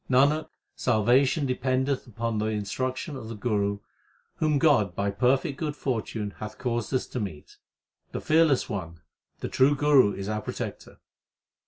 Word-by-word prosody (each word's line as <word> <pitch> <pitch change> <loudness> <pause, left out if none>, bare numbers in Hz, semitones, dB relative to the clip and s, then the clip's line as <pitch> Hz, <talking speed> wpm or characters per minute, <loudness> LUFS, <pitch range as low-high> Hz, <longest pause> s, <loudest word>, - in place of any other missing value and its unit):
Nanak, 140 +4 +3 0.3
salvation 130 +6 +3
dependeth 130 +1 0
upon 115 -1 -2
the 105 - 0
instruction 130 - -3
of 110 -4 -7
the 115 - -5
Guru 100 -2 -1 0.6
whom 155 -2 +2
God 130 - +3
by 100 0 0
perfect 130 +5 +1
good 150 -2 -2
fortune 110 -6 -3
hath 110 0 -7
caused 120 -4 -2
us 130 - 0
to 125 - -5
meet. 95 -9 -7 0.5
The - - -3
Fearless 155 -4 +3
One, 85 -5 -5 0.4
the - - -2
true 140 +3 +3
Guru 140 -7 +5
is 100 0 -5
our 105 0 -2
protector. - - -6
125 Hz, 150 wpm, -27 LUFS, 105-135 Hz, 0.6 s, Guru